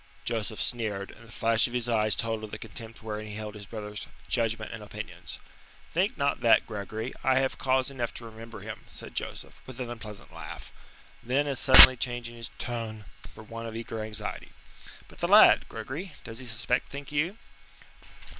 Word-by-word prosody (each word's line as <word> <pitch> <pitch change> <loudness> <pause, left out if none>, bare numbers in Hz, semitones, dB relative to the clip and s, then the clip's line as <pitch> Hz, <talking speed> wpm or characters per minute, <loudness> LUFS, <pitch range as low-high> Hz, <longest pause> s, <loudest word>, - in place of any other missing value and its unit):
Joseph 110 -2 -2
sneered, 105 -5 -1
and 115 +1 -16
the - - -14
flash 115 0 +3
of 120 - -9
his 125 -1 0
eyes 110 -2 +3
told 115 -1 -1
of 110 - -6
the 105 - -6
contempt 115 +1 -7
wherein 110 -1 -4
he 105 - -7
held 105 -1 -5
his 105 -2 -9
brother's 105 -1 -6 0.2
judgment 115 -2 0
and 110 - -7
opinions. 105 - -7 0.6
"Think 185 +5 +1
not 140 -1 +1
that, 115 - +5
Gregory. 110 +3 -5
I 130 0 +4
have 135 0 +1
cause 130 0 +2
enough 120 -4 -2
to 120 - -7
remember 115 0 -10
him," - - -8
said - - -9
Joseph, - - -6
with 130 -1 -9
an 120 -2 -4
unpleasant 110 -3 -9
laugh. - - -8 0.5
Then 135 +4 +1
as 140 -3 -1
suddenly 130 -1 +11
changing 120 -1 -3
his 115 0 -5
tone 115 -3 -5 0.3
for 110 - -10
one 115 +1 -7
of 110 - -7
eager 115 -1 -4
anxiety: 110 -1 -3 0.6
"But - - -16
the - - 0
lad, - - +7
Gregory, 160 +6 -6
does 115 -1 -5
he 130 - -6
suspect, 120 +2 0
think 140 +1 -7
you?" 165 +8 0
115 Hz, 185 wpm, -28 LUFS, 110-125 Hz, 0.6 s, suddenly